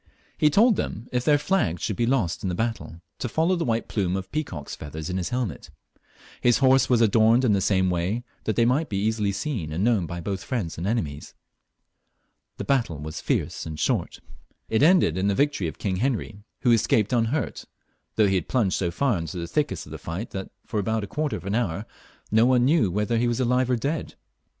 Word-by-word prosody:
He 150 - +4
told 215 - +4
them, 110 +4 -4
if 125 -1 0
their 145 +2 +4
flags 140 - 0
should 105 - -1
be 120 +2 0
lost 115 -10 0
in 95 - -2
the 90 - -2
battle, 110 -6 -3 0.2
to 120 - -3
follow 165 +8 +2
the 170 - -1
white 115 -1 -1
plume 95 -4 -1
of 95 0 -7
peacock's 95 - -4
feathers 80 +3 -6
in 90 - -2
his 90 - -2
helmet 120 - -3 0.7
His 120 -1 +4
horse 135 0 +4
was 120 -2 +4
adorned 115 +3 +4
in 110 - +4
the 100 - +2
same 95 -2 +2
way, 90 +7 -1 0.2
that 110 - 0
they 115 - +3
might 140 +7 +1
be 100 +1 0
easUy 105 -2 0
seen 100 - -3
and 85 +5 -1
known 110 -7 +2
by 85 +2 -5
*both 95 +2 -4
friends 105 -11 -3
and 90 - -2
enemies. 80 -11 -3 1.2
The - - -4
battle 120 - 0
was 75 +2 -6
fierce - - -2
and 80 -1 -6
short. - - -1 0.5
It 110 - +1
ended 155 - +4
in 95 - +1
the 100 - +2
victory 145 - +1
of 80 - -7
King 95 -3 -2
Heniy, 110 -3 -2 0.2
who 125 - +3
escaped 110 -1 +2
unhurt, 120 +2 0 0.5
though 110 - +4
he 95 - +1
had 90 -4 0
plunged 110 -8 +1
so 90 - 0
£eur 115 +2 0
into 80 +2 -5
the 85 - -3
thickest 150 - -1
of 75 - -13
the 80 - -7
fight 85 +9 -5
that, 95 -1 -5 0.2
for 105 - -2
about 110 +2 -1
a - - -2
quarter 150 +7 -2
of - - -8
an 100 - -2
hour, 105 -3 -1 0.5
no 110 +3 +5
one 125 -1 +4
knew 130 - +2
if 105 - -1
he 120 +1 +2
were 120 - +1
alive 125 0 +2
or 125 - +3
dead. 145 +7 -3
110 Hz, 220 wpm, -25 LUFS, 95-125 Hz, 1.2 s, no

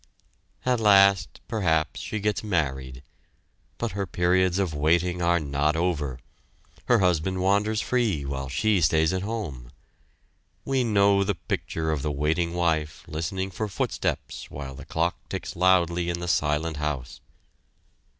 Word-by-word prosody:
At 125 -2 +2
last 100 -3 +4
perhaps 80 -8 0
she 110 - -4
gets 105 -1 -1
married. 65 -9 -2 0.7
But 115 -2 -2
her 100 -1 -3
periods 90 +1 +2
of 95 -5 0
waiting 85 +4 +1
are 85 0 +3
not 75 +1 0
over. 80 -7 -1 0.7
Her 120 - +4
husband 90 -1 +1
wanders 105 +3 +2
free 110 - 0
while 70 -1 -4
she 100 +8 +2
stays 80 +2 +3
at 95 - -1
home. 95 - -5 0.9
We 135 -2 +1
know 100 -3 +4
the 100 0 -1
picture 80 -1 -3
of 75 -3 -1
the 75 - -1
waiting 80 +4 0
wife 80 -3 0
listening 95 +5 -3
for 110 +3 -3
footsteps 100 - -3
while 70 -1 -7
the - - -10
clock 85 +2 -1
ticks - - -5
loudly 85 -1 +3
in 85 0 -2
the 85 - -5
silent 75 -1 0
house. 75 -4 -4
85 Hz, 140 wpm, -26 LUFS, 75-100 Hz, 0.9 s, last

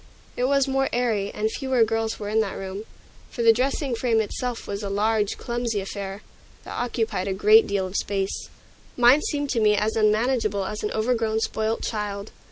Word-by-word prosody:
It 250 - 0
was 275 0 +3
more 270 0 +1
airy, 225 -5 0
and 220 +1 -1
fewer 260 -3 +1
girls 225 0 -1
were 205 - -5
in 215 +1 +1
the 210 -3 -1
room, 195 +2 -6 0.4
for 235 - -3
the 225 -1 +7
dressing 265 +2 -1
frame 230 -1 +1
itself 235 +3 -3
was 200 +1 -4
a 200 - -4
large, 210 +1 +1
clumsy 235 -3 -2
affair, 195 +1 -6 0.4
that - - -9
occupied 225 -5 -2
a 195 - 0
great 215 +3 +6
deal 200 -2 0
of 185 +1 -7
space. 195 -1 -2 0.5
Mine 250 +4 +6
seemed 290 -2 -2
to 235 - +1
me 210 -1 +4
as 210 +1 0
unmanageable 215 -2 +1
as 210 +2 -5
an 210 - -1
overgrown 220 -1 0
spoilt 220 0 -1
child. 205 -1 -4
220 Hz, 185 wpm, -24 LUFS, 205-240 Hz, 0.5 s, the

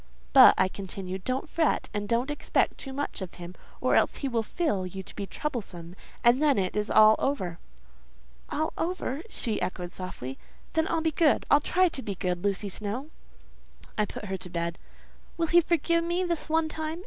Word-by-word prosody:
"But," 265 -2 +9
I 185 - +4
continued, 190 -1 -6
"don't 260 +5 -1
fret, 320 0 +1
and 205 0 -3
don't 240 +5 +1
expect 295 - 0
too 270 - -7
much 280 -5 -4
of 185 - -6
him, 175 0 -8 0.3
or - - +1
else - - +3
he 280 - -3
will 235 -3 0
feel 225 - -1
you 190 +1 -6
to - - -12
be 200 - -4
troublesome, 190 - -5 0.3
and 240 +4 +5
then 295 -3 +4
it 185 -1 0
is 210 0 0
all 215 0 +7
over." 185 -12 -1 0.9
"All 315 +1 -1
over!" 325 -5 -2
she 225 - -2
echoed 180 -1 -3
softly; 135 -8 -6 0.3
"then 320 0 +2
I'll 330 -1 0
be 320 0 +1
good. 310 -1 +3
I'll 290 - +7
try 370 +4 +3
to 275 - -6
be 200 -5 -4
good, 180 -1 -2
Lucy 200 0 0
Snowe." 215 - -4 0.8
I 210 - +2
put - - -7
her 190 -1 -3
to 180 - -8
bed. 170 -1 -3 0.6
"Will 335 - +1
he 345 +2 +5
forgive 335 0 +1
me 345 +2 0
this 340 -3 -2
one 320 0 +2
time?" 315 +1 -4
240 Hz, 195 wpm, -28 LUFS, 190-315 Hz, 0.9 s, But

